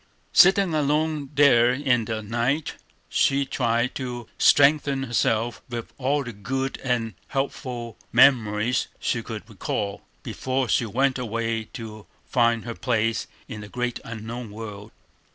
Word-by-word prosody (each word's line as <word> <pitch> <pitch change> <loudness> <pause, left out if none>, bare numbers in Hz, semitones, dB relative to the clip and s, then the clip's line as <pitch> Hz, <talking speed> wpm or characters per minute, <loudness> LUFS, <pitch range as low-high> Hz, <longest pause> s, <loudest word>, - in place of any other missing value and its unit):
Sitting 190 -1 +6
alone 150 -1 0
there 125 -4 +6
in 125 -3 +1
the 110 -1 -3
night, 120 +8 -1 0.3
she 140 0 +2
tried 120 -2 0
to 125 -3 -5
strengthen 140 -1 +4
herself 115 -2 0
with 120 -2 -6
all 140 +2 +1
the 120 -2 -7
good 135 +6 -3
and 120 -4 -1
helpful 125 -4 -4
memories 115 -2 +4
she - - -1
could - - -7
recall, 100 -1 -3 0.2
before 130 0 -2
she 115 +3 +1
went 130 +4 +1
away 115 -1 -2
to 110 -4 -8 0.2
find 115 -2 +2
her 115 - -4
place 115 -2 0 0.2
in 105 - -7
the 105 - -9
great 125 0 -2
unknown 115 +1 -6
world. 105 -1 -8
120 Hz, 135 wpm, -24 LUFS, 115-135 Hz, 0.3 s, Sitting